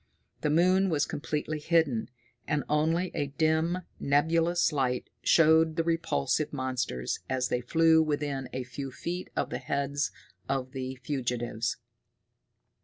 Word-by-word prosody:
The 150 Hz, -, +1 dB
moon 185 Hz, +5 st, +4 dB
was 150 Hz, -3 st, +2 dB
completely 150 Hz, +1 st, -3 dB
hidden, 150 Hz, -7 st, +1 dB, 0.4 s
and 150 Hz, -3 st, 0 dB
only 165 Hz, +4 st, +1 dB
a 145 Hz, -, -1 dB
dim, 160 Hz, +4 st, +1 dB, 0.2 s
nebulous 165 Hz, +4 st, +2 dB
light 125 Hz, -3 st, -1 dB
showed 160 Hz, 0 st, +5 dB
the 165 Hz, -, +1 dB
repulsive 155 Hz, -, 0 dB
monsters 130 Hz, -, -2 dB
as 130 Hz, -1 st, 0 dB
they 125 Hz, -, 0 dB
flew 160 Hz, +5 st, +4 dB
within 145 Hz, -4 st, -2 dB
a 130 Hz, -, -3 dB
few 135 Hz, +2 st, -6 dB
feet 175 Hz, +7 st, -5 dB
of -, -, -1 dB
the -, -, -2 dB
heads 140 Hz, +1 st, -1 dB, 0.4 s
of 130 Hz, -1 st, -1 dB
the 130 Hz, -1 st, -4 dB
fugitives. 120 Hz, -4 st, -2 dB
145 Hz, 130 wpm, -29 LUFS, 130-160 Hz, 0.4 s, showed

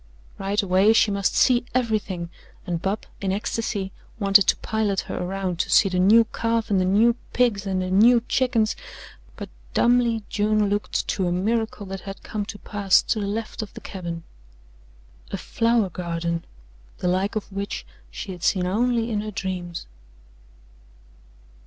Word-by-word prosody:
Right 200 Hz, +2 st, 0 dB
away 195 Hz, +3 st, +4 dB
she 220 Hz, -1 st, +4 dB
must 200 Hz, -1 st, 0 dB
see 245 Hz, -2 st, +4 dB
everything, 205 Hz, -8 st, -1 dB, 0.3 s
and 175 Hz, -3 st, -2 dB
Bub, 200 Hz, +3 st, -2 dB, 0.2 s
in 195 Hz, -1 st, 0 dB
ecstasy, 200 Hz, -1 st, -2 dB, 0.3 s
wanted 200 Hz, -1 st, +5 dB
to -, -, +5 dB
pilot 215 Hz, -3 st, -1 dB
her -, -, -6 dB
around 185 Hz, -1 st, -3 dB
to -, -, 0 dB
see 195 Hz, -, +5 dB
the 180 Hz, -1 st, 0 dB
new 215 Hz, +5 st, +6 dB
calf 230 Hz, -1 st, -1 dB
and 190 Hz, -2 st, +3 dB
the -, -, +1 dB
new 215 Hz, +5 st, +4 dB, 0.2 s
pigs 215 Hz, -5 st, +1 dB
and 185 Hz, -1 st, 0 dB
the 185 Hz, -, -3 dB
new 230 Hz, +5 st, +6 dB
chickens, 240 Hz, -4 st, +1 dB, 0.6 s
but -, -, -7 dB, 0.3 s
dumbly 235 Hz, -2 st, +3 dB
June 210 Hz, -1 st, +1 dB
looked 205 Hz, +1 st, -1 dB
to 190 Hz, -3 st, 0 dB
a -, -, 0 dB
miracle 215 Hz, +3 st, -1 dB
that 195 Hz, 0 st, -6 dB
had 195 Hz, -1 st, -9 dB
come 210 Hz, -2 st, -3 dB
to 220 Hz, -2 st, -7 dB
pass 200 Hz, -3 st, +2 dB
to 220 Hz, -, 0 dB
the 200 Hz, -, -2 dB
left 215 Hz, +2 st, -4 dB
of 215 Hz, -, -8 dB
the -, -, -8 dB
cabin 170 Hz, -3 st, -6 dB, 1.1 s
a -, -, -3 dB
flower 230 Hz, -4 st, +1 dB
garden, 170 Hz, -1 st, -3 dB, 0.5 s
the -, -, -2 dB
like 190 Hz, +4 st, 0 dB
of 215 Hz, -1 st, -4 dB
which 200 Hz, +1 st, -4 dB, 0.2 s
she 200 Hz, -, -7 dB
had 180 Hz, -2 st, -9 dB
seen 180 Hz, +1 st, +2 dB
only 230 Hz, +4 st, +1 dB
in 210 Hz, -1 st, 0 dB
her 215 Hz, -, -5 dB
dreams. 185 Hz, -4 st, -4 dB
200 Hz, 165 wpm, -24 LUFS, 185-220 Hz, 1.1 s, new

